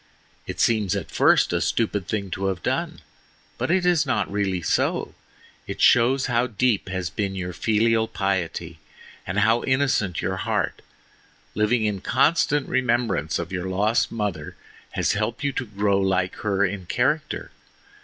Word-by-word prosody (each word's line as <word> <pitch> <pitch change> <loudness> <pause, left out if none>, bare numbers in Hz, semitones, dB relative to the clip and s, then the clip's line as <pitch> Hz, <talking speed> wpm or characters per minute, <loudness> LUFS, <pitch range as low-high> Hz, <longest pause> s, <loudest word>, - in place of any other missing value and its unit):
It - - -6
seems 110 -5 +2
at - - -5
first - - +4
a - - +1
stupid 105 -5 0
thing 100 -3 -3
to 95 +2 -3
have 95 -3 -3
done, - - -2 0.6
but - - -1
it 180 +1 +2
is 175 -3 +4
not 130 -7 -1
really 95 -3 -1
so, - - 0 0.5
It - - -6
shows 130 +3 +4
how 120 -1 +1
deep 115 -3 0
has 95 -4 -3
been 100 +2 -2
your 90 -1 -4
filial 110 +3 +2
piety, 90 -5 -2 0.5
and 95 +3 0
how 115 +3 +3
innocent 130 -9 +1
your 95 +1 -2
heart. - - -2 0.7
Living 110 +2 +1
in 100 -3 -1
constant 145 +3 +2
remembrance 120 - 0
of 85 0 -5
your 90 0 -3
lost 105 +5 +1
mother 100 -9 -4 0.4
has - - +1
helped 110 +6 -2
you 140 - +1
to 130 -2 -4
grow 100 -1 +1
like 95 -1 +1
her 100 -1 +1
in 95 -2 -4
character. 140 - -1
105 Hz, 155 wpm, -24 LUFS, 95-120 Hz, 0.7 s, first